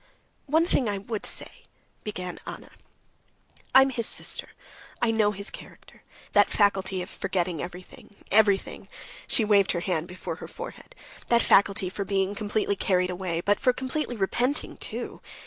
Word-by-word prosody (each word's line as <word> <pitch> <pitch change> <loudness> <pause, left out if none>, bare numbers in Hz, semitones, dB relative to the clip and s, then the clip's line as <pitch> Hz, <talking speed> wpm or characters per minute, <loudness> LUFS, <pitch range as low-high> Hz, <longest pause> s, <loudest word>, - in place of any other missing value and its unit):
"One 320 +4 +3
thing 260 - +1
I 200 - -1
would 210 +2 -4
say," - - -6 0.4
began 180 -4 -5
Anna. - - -8 1.0
"I 265 - +10
am 270 - 0
his 230 -3 +1
sister, - - +3 0.5
I 240 -2 +2
know 220 -2 +3
his 200 -1 -3
character, - - -13 0.3
that 205 0 +5
faculty 190 -3 +1
of - - -9
forgetting 175 -4 -2
everything, 180 +3 -10 0.2
everything" 205 -2 +2 0.4
(she 225 - +3
waved 200 -2 +4
her 175 - -2
hand 175 -3 -1
before 180 +1 -6
her - - -8
forehead), - - -10 0.3
"that 235 0 +4
faculty 195 -1 +4
for 195 +2 -4
being 195 0 0
completely 205 0 -1
carried 185 -2 +1
away, 175 -2 -3
but 205 +3 +2
for 250 - +3
completely 260 +1 -3
repenting 245 +8 0
too. - - -4
200 Hz, 155 wpm, -26 LUFS, 185-225 Hz, 1.0 s, I